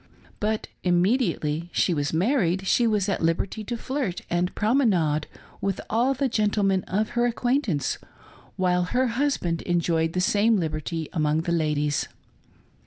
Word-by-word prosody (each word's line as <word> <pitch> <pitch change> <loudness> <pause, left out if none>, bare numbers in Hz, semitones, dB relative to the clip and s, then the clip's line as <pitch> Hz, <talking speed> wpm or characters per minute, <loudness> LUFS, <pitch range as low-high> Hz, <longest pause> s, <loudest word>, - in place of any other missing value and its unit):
But 215 +1 -1 0.2
immediately 175 - +1
she 180 - +2
was 145 -2 -1
married 190 - +1
she 235 +4 +3
was 210 -3 +1
at 195 - -1
liberty 170 +6 -1
to 240 +3 -3
flirt 255 -7 -3
and 175 +1 0
promenade 195 - +2 0.3
with 195 -1 -1
all 245 +5 +2
the 275 +1 +1
gentle 210 -3 +1
men 195 -1 +2
of 210 +3 -1
her 240 0 +1
acquaintance, 240 - 0 0.6
while 180 -1 +1
her 250 +8 +1
husband 230 - 0
enjoyed 165 -2 0
the 180 - 0
same 210 +4 +3
liberty 160 -1 -3
among 155 -2 +1
the 170 - -3
ladies. 150 -3 0
185 Hz, 145 wpm, -25 LUFS, 165-225 Hz, 0.6 s, she